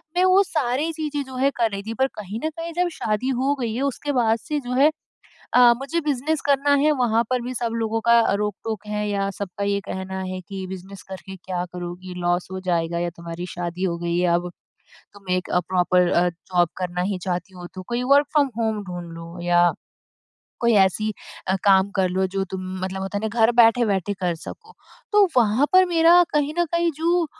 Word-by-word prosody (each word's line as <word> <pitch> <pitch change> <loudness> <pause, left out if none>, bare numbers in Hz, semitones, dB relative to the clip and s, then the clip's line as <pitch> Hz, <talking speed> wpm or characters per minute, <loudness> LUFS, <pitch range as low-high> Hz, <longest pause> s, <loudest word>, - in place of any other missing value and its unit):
मैं 360 - +3
वो 370 +1 +6
सारी 300 -3 -1
चीज़ें 300 -2 -3
जो 260 0 -10
है 265 +2 +2
कर 230 -2 +2
रही 200 0 -4
थी। 220 +2 -5
पर 265 - +4
कहीं 210 +1 -6
न - - +1
कहीं 330 +1 -7
जब 355 +1 +1
शादी 215 +1 -1
हो 265 +2 +1
गई 235 -3 -2
है 255 - -2
उसके 280 +1 -2
बाद 230 -3 +2
से 300 +6 -3
जो 250 -2 -5
है 275 +4 +5 0.7
अ, 245 -1 +8
मुझे 280 +6 -2
बिज़नेस 300 +1 -1
करना 285 0 +3
है 305 +1 +4
वहाँ 235 -5 +2
पर 255 -1 +1
भी 250 +1 -5
सब 235 -2 -2
लोगों 225 0 -1
का 235 0 +6
अ, 230 - +2
रोक-टोक 210 +1 -4
है 210 0 -2
या 200 -1 -1
सबका 200 0 -5
ये 200 0 0
कहना 190 0 -5
है 185 0 -5
कि, 190 0 -7
"बिज़नेस 190 +1 -9
करके 190 0 -8
क्या 180 -1 -4
करोगी? 180 +1 -7
लॉस 175 0 0
हो 190 - -4
जाएगा 170 -2 -1
या 175 0 -1
तुम्हारी 170 +1 -6
शादी 175 0 -5
हो 170 -2 0
गई 170 0 -1
है 180 0 +2
अब। 175 +1 -1 0.6
तुम 200 -2 -14
एक 185 - -3
अ, 180 - +2
प्रॉपर 180 -1 +3
अ, 175 +1 +3
जॉब 175 0 0
करना 180 -1 -2
ही 195 - -2
चाहती 180 +1 -3
हो 175 -1 -8
तो 185 - -6
कोई 240 +1 -1
वर्क 285 +1 +5
फ्रॉम 290 -3 +3
होम 220 -2 -1
ढूँढ 175 -3 -7
लो 165 +1 -9
या, 175 0 +4 0.9
कोई 235 -1 +3
ऐसी 215 +3 -2 0.4
अ, 190 - +2
काम 195 0 +5
कर 185 - +2
लो 190 +1 +1
जो 195 - +1
तुम 185 -1 -5
मतलब 190 0 -4
होता 195 +1 -3
है - - -7
ना 230 +2 -3
घर 225 +2 +5
बैठे-बैठे 210 -4 +2
कर 180 -2 0
सको।" 450 0 -10 0.4
तो 415 -2 +5
वहाँ 235 +3 +4
पर 370 0 +6
मेरा 335 +2 +7
कहीं 295 0 +1
न 345 - +4
कहीं 340 0 +2
जो 340 +1 +2
210 Hz, 215 wpm, -23 LUFS, 185-265 Hz, 0.9 s, अ